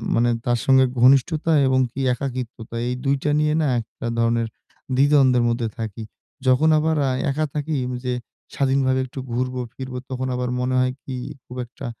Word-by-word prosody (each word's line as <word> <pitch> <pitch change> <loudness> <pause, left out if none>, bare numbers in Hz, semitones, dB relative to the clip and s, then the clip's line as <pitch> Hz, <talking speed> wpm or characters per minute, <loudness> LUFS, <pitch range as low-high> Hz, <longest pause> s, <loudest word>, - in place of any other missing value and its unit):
মানে 120 +1 +3 0.2
তার 120 -1 +1
সঙ্গে 130 -1 +6 0.2
ঘনিষ্ঠতা 145 +5 +4 0.2
এবং 130 0 +3
কী 130 - -7
একাকিত্বতা 125 -3 -5
এই 125 - 0
২ 140 +1 +3
টা 150 - +1
নিয়ে 150 0 +2
না 150 - +1
একটা 115 - -10
ধরনের 115 0 +2 0.5
দ্বিধা-দ্বন্দ্বের 135 -3 +4
মধ্যে 115 -1 -1
থাকি। 110 -1 -5 0.4
যখন 130 +5 +4
আবার 160 +1 +1
আ - - +1 0.2
একা 155 +2 0
থাকি 150 +1 -2 0.2
ওই 125 - -4
যে 125 - 0 0.4
স্বাধীনভাবে 135 -1 +2
একটু 130 +1 -8
ঘুরবো 125 +1 -1
ফিরবো 130 -1 -6
তখন 130 0 -3
আবার 125 0 -2
মনে 130 +1 0
হয় 130 0 +2
কী 130 - -6 0.3
খুব 125 - -10
একটা 130 +2 -10
130 Hz, 175 wpm, -22 LUFS, 125-140 Hz, 0.5 s, সঙ্গে